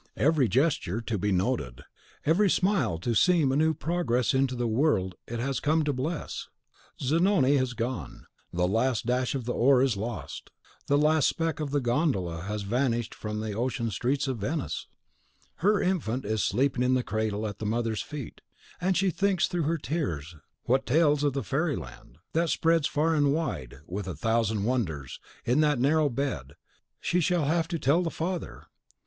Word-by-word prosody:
Every 150 -3 +3
gesture 125 - +1
to 115 -2 -3
be 105 +2 0
noted, 90 - -1 0.4
every 190 +6 +4
smile 175 - +1
to 115 +8 -2
seem 160 +2 +4
a - - +1
new 160 +2 +2
progress 150 -8 0
into 130 -1 +1
the 120 0 -1
world 110 - +1
it 120 0 -4
has 135 +2 -1
come 155 +1 +2
to 145 -1 0
bless! 150 +6 -4 0.5
Zanoni 150 -1 +3
has 130 -2 0
gone, 120 +2 -4 0.3
the 90 +1 +1
last 115 +5 +1
dash 125 +2 0
of 130 -4 -3
the 120 - -1
oar 130 +1 +4
is 130 -5 +2
lost, 110 +3 -6 0.4
the 145 - +3
last 155 0 +4
speck 165 -2 -1
of 150 -2 -2
the 145 +1 +1
gondola 120 - 0
has 105 +3 -4
vanished 120 +1 0
from 105 0 -5
the 110 -1 -3
ocean 115 +1 -1
streets 135 +8 0
of 130 -4 -2
Venice! 140 +9 -3 0.7
Her 205 +4 +3
infant 135 - -1
is 110 0 0
sleeping 130 +3 +1
in 125 +1 +3
the 125 - +1
cradle 110 0 -2
at 105 -1 -5
the 110 - -3
mother's 115 0 -1
feet; 145 -4 -8 0.4
and 185 0 +2
she 195 -1 +2
thinks 195 0 +1
through 175 -3 -1
her 165 - +1
tears 100 - -3 0.3
what 130 +2 +1
tales 150 +1 +3
of 145 -2 +2
the 135 - -2
fairy 150 +1 0
land, - - -10 0.2
that 165 +1 +1
spreads 165 -1 +2
far 160 +3 +1
and 145 -2 +3
wide, 110 - -3
with 95 +3 -5
a 90 - -4
thousand 110 +3 0
wonders, 95 - -2 0.3
in 125 +5 +2
that 150 -2 +3
narrow 145 +4 +3
bed, 115 - -3 0.4
she 180 - +1
shall 175 -2 +1
have 165 +2 +1
to 170 0 -2
tell 155 +4 +3
the 170 - -1
father! 170 +1 -4
130 Hz, 180 wpm, -28 LUFS, 110-155 Hz, 0.7 s, every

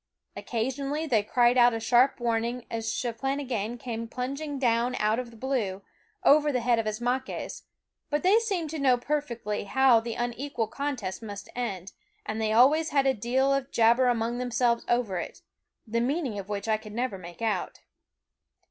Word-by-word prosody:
Occasionally 275 +6 -2
they 235 -8 +2
cried 240 +4 +3
out 240 -1 +6
a - - -2
sharp 245 +4 +3
warning 235 +1 -1
as 225 -1 -2
Cheplahgan 245 -2 -2
came 230 -1 -5
plunging 275 +5 -4
down 245 -1 +1
out 215 +2 +1
of 250 -2 -5
the 230 - -15
blue, 220 -7 -2 0.4
over 295 +1 +5
the 250 -3 0
head 235 -1 +2
of 220 - -2
Ismaques; 245 +4 -3 0.4
but 295 0 -1
they 395 +5 +5
seemed 380 -9 -2
to 320 - -4
know 260 -3 +4
perfectly 240 -7 -3
how 260 +2 +5
the 230 0 -5
unequal 240 0 -2
contest 255 -9 -4
must 205 -2 -8
end, 195 -6 -4 0.3
and 220 +1 -3
they 215 -1 0
always 285 +8 +5
had 275 -1 +2
a 270 - +4
deal 260 +4 +1
of 275 -1 -1
jabber 235 +2 +4
among 240 0 0
themselves 240 -1 +1
over 235 -7 +1
it, - - -7 0.4
the 230 +1 -1
meaning 260 -4 -1
of 195 0 -8
which 205 0 -3
I 220 -1 +2
could 215 -1 -11
never 235 -4 -2
make 175 +4 -10
out. 210 -5 -2
240 Hz, 175 wpm, -27 LUFS, 225-265 Hz, 0.4 s, out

